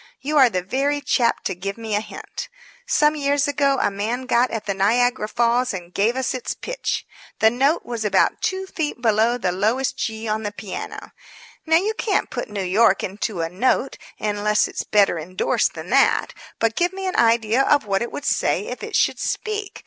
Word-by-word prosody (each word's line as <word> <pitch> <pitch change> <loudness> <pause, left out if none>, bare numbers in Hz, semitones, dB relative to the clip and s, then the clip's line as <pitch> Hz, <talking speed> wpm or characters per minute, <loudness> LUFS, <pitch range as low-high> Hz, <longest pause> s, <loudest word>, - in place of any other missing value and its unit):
You 295 +3 -3
are 260 -3 +7
the 185 -5 -2
very 275 +8 0
chap 245 -4 +1
to - - -1
give 195 +3 -5
me 225 -2 -5
a 205 - +1
hint. - - -8 0.4
Some 300 -10 +3
years 285 0 +1
ago 280 -1 +2
a - - +1
man 220 +6 -2
got 250 0 +2
at 225 -2 -4
the 200 - -1
Niagara 230 +4 +2
Falls 240 +1 +1
and 175 -1 -9
gave 220 +5 +1
us 260 0 -1
its 255 - -4
pitch. - - -3 0.3
The 220 - +4
note 275 +7 +1
was 235 -2 -4
about 210 - +2
two 380 0 -1
feet 315 -8 -4
below 230 +1 +2
the 185 -7 -1
lowest 220 +8 0
G 220 -1 -3
on 215 0 -1
the 205 -1 -3
piano. 205 -2 -7 0.6
Now, 320 0 +5
you 410 +6 0
can't 430 -2 -1
put - - -4
New 205 -2 -3
York 190 +2 +3
into 195 -1 -3
a 165 - -2
note 250 +8 0 0.2
unless 210 0 +1
it's - - -4
better 200 -5 +3
indorsed 185 +4 0
than - - -8
that. - - +3 0.2
But 225 0 0
give 350 +1 +1
me 385 0 -5
an 370 - -2
idea 230 +1 +3
of 285 -2 +3
what 195 -1 0
it 235 - -3
would 285 - -6
say - - 0
if - - -6
it - - -5
should - - +2
speak. 425 -2 -3
235 Hz, 200 wpm, -22 LUFS, 210-275 Hz, 0.6 s, are